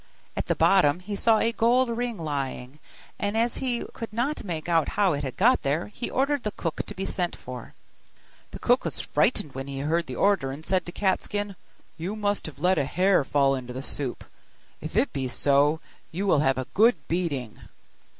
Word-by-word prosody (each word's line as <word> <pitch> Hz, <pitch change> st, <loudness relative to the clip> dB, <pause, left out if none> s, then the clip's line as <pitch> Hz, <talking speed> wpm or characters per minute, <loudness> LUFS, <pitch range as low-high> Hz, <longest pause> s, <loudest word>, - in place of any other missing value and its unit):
At -, -, -3 dB
the -, -, +1 dB
bottom 180 Hz, -5 st, +4 dB
he 200 Hz, +3 st, -5 dB
saw 225 Hz, +2 st, +4 dB
a 230 Hz, -, +2 dB
gold 245 Hz, +3 st, +3 dB
ring 235 Hz, -1 st, -2 dB
lying; 140 Hz, -3 st, -4 dB, 0.4 s
and 205 Hz, +2 st, -1 dB
as 235 Hz, +1 st, +1 dB
he 250 Hz, -3 st, -1 dB
could 230 Hz, -, -6 dB
not 245 Hz, +7 st, -1 dB
make 165 Hz, -5 st, -4 dB
out 165 Hz, -3 st, +2 dB
how 200 Hz, -4 st, +4 dB
it 145 Hz, 0 st, -3 dB
had 130 Hz, -2 st, -5 dB
got 245 Hz, +6 st, +4 dB
there, 145 Hz, +7 st, -1 dB
he 240 Hz, -, -4 dB
ordered 280 Hz, +1 st, +1 dB
the 210 Hz, -, -2 dB
cook 165 Hz, -5 st, -3 dB
to -, -, -5 dB
be 195 Hz, -, -3 dB
sent 180 Hz, -2 st, -2 dB
for. 125 Hz, -1 st, -9 dB, 0.7 s
The -, -, -8 dB
cook -, -, +2 dB
was -, -, -3 dB
frightened 145 Hz, -, +1 dB
when 135 Hz, +1 st, -5 dB
he 135 Hz, -1 st, -4 dB
heard 165 Hz, +4 st, 0 dB
the 130 Hz, -, -5 dB
order, 190 Hz, -8 st, +2 dB
and 150 Hz, +4 st, -8 dB
said 185 Hz, -2 st, 0 dB
to -, -, -4 dB
Cat 190 Hz, +1 st, +1 dB
skin, 205 Hz, -1 st, -3 dB, 0.4 s
'You 185 Hz, +6 st, -3 dB
must 205 Hz, -3 st, 0 dB
have 155 Hz, -, -9 dB
let 180 Hz, +2 st, +3 dB
a 140 Hz, -, +1 dB
hair 180 Hz, +3 st, +3 dB
fall 135 Hz, 0 st, +2 dB
into 125 Hz, -2 st, -5 dB
the 130 Hz, +2 st, -5 dB
soup; 135 Hz, -3 st, -3 dB, 0.6 s
if -, -, -5 dB
it -, -, +2 dB
be 135 Hz, -2 st, -2 dB
so, 145 Hz, +4 st, +3 dB, 0.3 s
you 185 Hz, +5 st, -2 dB
will 185 Hz, -7 st, +4 dB
have 135 Hz, -2 st, +2 dB
a 130 Hz, -, -2 dB
good 225 Hz, +5 st, +5 dB
beating. 150 Hz, -10 st, -2 dB
175 Hz, 210 wpm, -26 LUFS, 140-205 Hz, 0.7 s, good